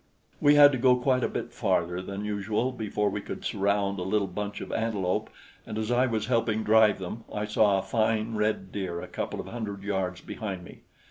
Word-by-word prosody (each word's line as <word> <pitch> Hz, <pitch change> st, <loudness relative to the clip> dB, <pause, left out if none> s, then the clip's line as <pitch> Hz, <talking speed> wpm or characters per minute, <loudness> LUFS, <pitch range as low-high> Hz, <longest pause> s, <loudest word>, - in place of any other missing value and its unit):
We 145 Hz, 0 st, +5 dB
had 145 Hz, -1 st, +9 dB
to 130 Hz, -, -2 dB
go 125 Hz, 0 st, +5 dB
quite 125 Hz, 0 st, +1 dB
a -, -, +3 dB
bit -, -, -5 dB
farther 90 Hz, +1 st, 0 dB
than 100 Hz, +2 st, -5 dB
usual 105 Hz, +4 st, -1 dB
before 105 Hz, -4 st, -1 dB
we 105 Hz, -, -3 dB
could -, -, -7 dB
surround 100 Hz, -1 st, 0 dB
a -, -, -3 dB
little 100 Hz, +2 st, +1 dB
bunch 105 Hz, +1 st, -5 dB
of -, -, -7 dB
antelope, 105 Hz, -5 st, -1 dB, 0.3 s
and 110 Hz, -, -6 dB
as 110 Hz, +2 st, -2 dB
I 125 Hz, +2 st, +3 dB
was 110 Hz, -3 st, -1 dB
helping 115 Hz, -3 st, +1 dB
drive 110 Hz, 0 st, +5 dB
them, 95 Hz, +5 st, -6 dB
I 105 Hz, 0 st, -2 dB
saw 105 Hz, -1 st, +3 dB
a 95 Hz, -, -1 dB
fine 110 Hz, 0 st, 0 dB
red 105 Hz, -3 st, -1 dB
deer 90 Hz, -4 st, -3 dB
a -, -, -7 dB
couple -, -, -4 dB
of -, -, -6 dB
hundred 105 Hz, -4 st, -5 dB
yards 95 Hz, -3 st, -2 dB
behind 95 Hz, -5 st, -5 dB
me. -, -, -13 dB
105 Hz, 210 wpm, -28 LUFS, 100-115 Hz, 0.3 s, had